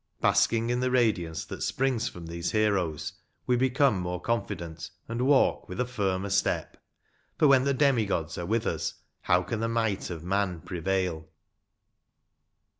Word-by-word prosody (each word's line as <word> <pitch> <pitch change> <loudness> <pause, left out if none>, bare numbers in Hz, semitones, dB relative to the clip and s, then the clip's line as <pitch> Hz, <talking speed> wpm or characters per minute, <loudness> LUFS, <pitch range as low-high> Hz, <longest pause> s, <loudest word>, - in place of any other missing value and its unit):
Basking 115 +1 +2
in 125 - +1
the 130 0 +1
radiance 105 -10 +1
that - - -8
springs 125 -3 0
from 90 -6 -10
these 85 +1 -3
heroes, 100 -8 0 0.3
we 125 - +2
become 130 -3 +3
more 90 0 -3
confident, 85 -7 -3 0.2
and 120 +3 -1
walk 140 -2 +3
with 90 - -6
a 125 - +2
firmer 100 -5 -2
step; 100 - 0 0.6
for 150 - +5
when 135 -1 +5
the 140 - +2
demi 130 -6 +3
gods 85 -3 -2
are 85 - -4
with 115 +1 0
us, - - -2 0.3
how 90 0 +3
can 115 +3 -3
the 115 +1 -1
might 110 -4 -1
of 85 -3 -6
man 95 -2 -1
prevail 90 -2 -2
100 Hz, 160 wpm, -28 LUFS, 90-120 Hz, 0.6 s, for